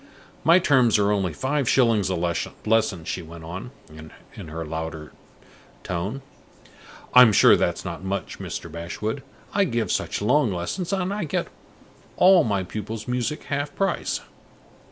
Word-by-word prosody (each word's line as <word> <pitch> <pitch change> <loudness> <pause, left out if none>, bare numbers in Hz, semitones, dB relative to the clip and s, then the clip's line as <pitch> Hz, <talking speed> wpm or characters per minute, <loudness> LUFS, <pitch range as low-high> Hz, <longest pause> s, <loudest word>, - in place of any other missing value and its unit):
My 170 +2 +6
terms 130 - +4
are 100 0 +2
only 95 -4 0
five 135 - -1
shillings 115 -7 +3
a 95 - 0
lesson," 90 +2 -1
she 90 - -3
went 85 0 -11
on, 90 +8 -7 0.6
in - - -9
her 80 +1 -5
louder 80 -1 -5 0.7
tone. 95 +10 -4 0.9
"I'm 125 -3 +9
sure 100 - +7
that's - - -1
not - - -6
much, 95 +1 -4
Mr. - - -5
Bashwood; 85 - -4 0.3
I 200 - +3
give 115 - -1
such - - -1
long 125 +3 +2
lessons, 95 - -3
and 190 0 -1
I 205 -4 -2
get 150 - -2 0.7
all 185 0 +6
my 100 -4 0
pupils' 105 +4 -6
music 125 +3 -2
half 145 0 -3
price." 195 -1 -1
110 Hz, 145 wpm, -24 LUFS, 90-140 Hz, 0.9 s, I'm